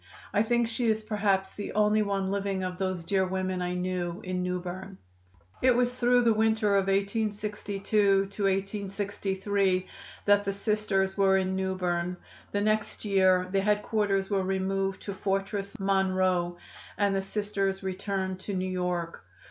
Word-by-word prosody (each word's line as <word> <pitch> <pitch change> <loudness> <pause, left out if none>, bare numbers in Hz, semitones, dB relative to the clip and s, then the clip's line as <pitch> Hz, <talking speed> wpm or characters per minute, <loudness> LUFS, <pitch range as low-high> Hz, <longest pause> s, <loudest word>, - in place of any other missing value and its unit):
I 205 - +4
think 235 +1 +2
she 230 +1 -1
is 220 0 +1
perhaps 200 -3 0
the 205 - -6
only 210 0 +3
one 195 -2 -1
living 195 -1 -1
of 180 0 -4
those 185 -3 -2
dear 195 0 +2
women 185 0 -2
I 180 0 -2
knew 180 -1 -2
in 185 -1 -2
New 180 0 -1
Berne. 185 +2 -7 0.6
"It 255 -1 +5
was 245 0 +2
through 245 0 +3
the 230 -1 +4
winter 220 -1 +2
of 195 -1 +2
1862 200 -1 +1 0.6
63 195 -1 -1 0.4
that 205 0 +5
the 200 0 -1
Sisters 200 -2 0
were 195 -1 +4
in 190 0 0
New 190 0 -1
Berne. 180 -1 -1 0.3
The 205 - 0
next 215 +1 0
year 185 -2 +4
the 195 0 +2
headquarters 205 -1 +1
were 195 -1 +1
removed 195 0 -1
to 200 - -4
Fortress 195 +2 -2
Monroe 185 -2 +1 0.4
and 200 -1 +2
the 195 - +1
Sisters 195 -1 -2
returned 190 0 -2
to 200 +1 -5
New 185 0 -1
York. 180 -2 -2
195 Hz, 155 wpm, -28 LUFS, 185-205 Hz, 0.6 s, It